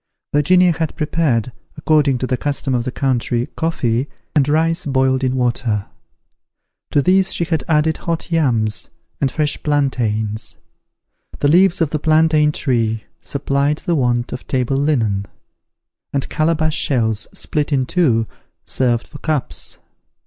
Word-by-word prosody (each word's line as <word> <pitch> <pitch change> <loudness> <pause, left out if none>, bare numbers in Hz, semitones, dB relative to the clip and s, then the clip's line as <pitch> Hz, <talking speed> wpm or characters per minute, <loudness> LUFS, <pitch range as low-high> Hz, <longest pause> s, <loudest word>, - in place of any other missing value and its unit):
Virginia 180 +5 +4
had 160 -1 -2
prepared, 150 -8 0 0.3
according 150 -3 +2
to 130 - -2
the 130 - 0
custom 140 +1 -2
of 120 -1 0
the 130 - -2
country, 120 -2 0
coffee, 130 -6 0 0.3
and 145 -1 +3
rice 165 +3 +1
boiled 130 -1 +1
in 130 0 +1
water. 120 -4 0 1.0
To 145 - +2
these 190 +2 +3
she - - 0
had 160 -2 -1
added 160 0 +2
hot 170 +1 -4
yams, 115 -10 +1 0.3
and 135 - +1
fresh 150 +1 -1
plantains. 110 -7 -1 0.8
The 145 - +2
leaves 180 +2 +4
of 155 -3 +1
the 155 - -1
plantain 155 0 +3
tree, 115 -7 -1 0.2
supplied 140 +1 -1
the 175 - +1
want 120 -4 0
of - - -8
table 130 0 0
linen; 115 -9 0 0.8
and 140 -1 -1
calabash 155 0 +1
shells, 110 -5 0
split 150 0 -2
in 135 -3 +2
two, 125 -8 +2 0.4
served 120 -3 +1
for 145 - -11
cups. 155 -4 -3
140 Hz, 140 wpm, -19 LUFS, 120-155 Hz, 1.0 s, Virginia